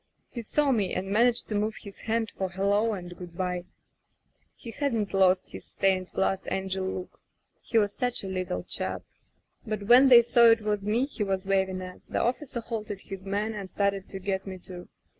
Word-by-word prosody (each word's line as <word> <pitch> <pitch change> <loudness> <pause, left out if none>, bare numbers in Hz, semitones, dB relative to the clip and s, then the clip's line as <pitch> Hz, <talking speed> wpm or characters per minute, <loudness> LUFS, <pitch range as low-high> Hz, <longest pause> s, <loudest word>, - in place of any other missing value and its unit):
He 235 - -5
saw 285 +5 +1
me 210 -7 0
and 190 +1 -3
managed 240 +3 +3
to - - -2
move 210 +1 0
his 200 -2 -11
hand 225 0 -1
for 190 -1 -3
hello 200 +4 +1
and 175 -3 -7
good 175 -1 -10
by. 180 -1 -2 0.9
He 230 - -9
hadn't 230 -6 -1
lost 190 -1 +3
his - - -8
stained 190 -1 +1
glass 190 0 -1
angel 190 0 -2
look. 185 -1 -6 0.4
He 230 - -1
was 205 -2 +3
such 245 -2 -1
a - - -4
little 185 - -3
chap.... - - -3 0.6
"But 215 -2 -4
when 245 +5 +7
they 240 -2 +9
saw 235 0 +5
it 230 -1 +6
was 210 -1 -1
me 220 +5 +1
he 275 -6 -3
was 195 -2 -2
waving 190 -1 0
at, 180 0 -9
the - - -1
officer 250 0 -2
halted 215 -4 -5
his 195 -1 -8
men 205 +3 -2
and 200 -3 -6
started 200 -1 -1
to 195 - -6
get 190 0 -3
me 190 -1 -5
too. 180 -1 -11
200 Hz, 195 wpm, -28 LUFS, 190-225 Hz, 0.9 s, they